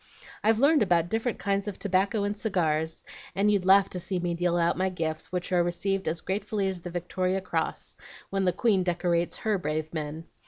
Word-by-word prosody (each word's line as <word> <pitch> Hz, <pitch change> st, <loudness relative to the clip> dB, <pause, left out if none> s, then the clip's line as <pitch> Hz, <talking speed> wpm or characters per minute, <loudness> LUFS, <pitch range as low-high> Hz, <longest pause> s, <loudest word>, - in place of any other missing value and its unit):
I've 220 Hz, +1 st, +4 dB
learned 290 Hz, +5 st, +5 dB
about 175 Hz, -4 st, +3 dB
different 225 Hz, +2 st, -1 dB
kinds 200 Hz, 0 st, -1 dB
of 205 Hz, -, -4 dB
tobacco 200 Hz, +2 st, +1 dB
and 205 Hz, +1 st, -1 dB
cigars, 160 Hz, -7 st, -1 dB, 0.3 s
and 205 Hz, +2 st, +3 dB
you'd 200 Hz, -3 st, +1 dB
laugh 195 Hz, 0 st, +7 dB
to 180 Hz, -, -3 dB
see 180 Hz, +2 st, -2 dB
me 175 Hz, -1 st, -1 dB
deal 175 Hz, 0 st, +1 dB
out 170 Hz, 0 st, +2 dB
my 190 Hz, +1 st, +1 dB
gifts, 160 Hz, -3 st, -4 dB
which 180 Hz, 0 st, -3 dB
are 180 Hz, -1 st, +4 dB
received 190 Hz, +2 st, -1 dB
as 160 Hz, +1 st, -1 dB
gratefully 200 Hz, +1 st, -1 dB
as 185 Hz, -2 st, -3 dB
the 175 Hz, -, -6 dB
Victoria 185 Hz, +2 st, -1 dB
Cross, 190 Hz, -, -3 dB, 0.3 s
when 195 Hz, -1 st, 0 dB
the 180 Hz, -, +4 dB
Queen 205 Hz, -1 st, +2 dB
decorates 175 Hz, -1 st, 0 dB
HER 215 Hz, -3 st, 0 dB
brave 155 Hz, -1 st, -3 dB
men. 155 Hz, 0 st, -4 dB
185 Hz, 200 wpm, -28 LUFS, 170-200 Hz, 0.3 s, laugh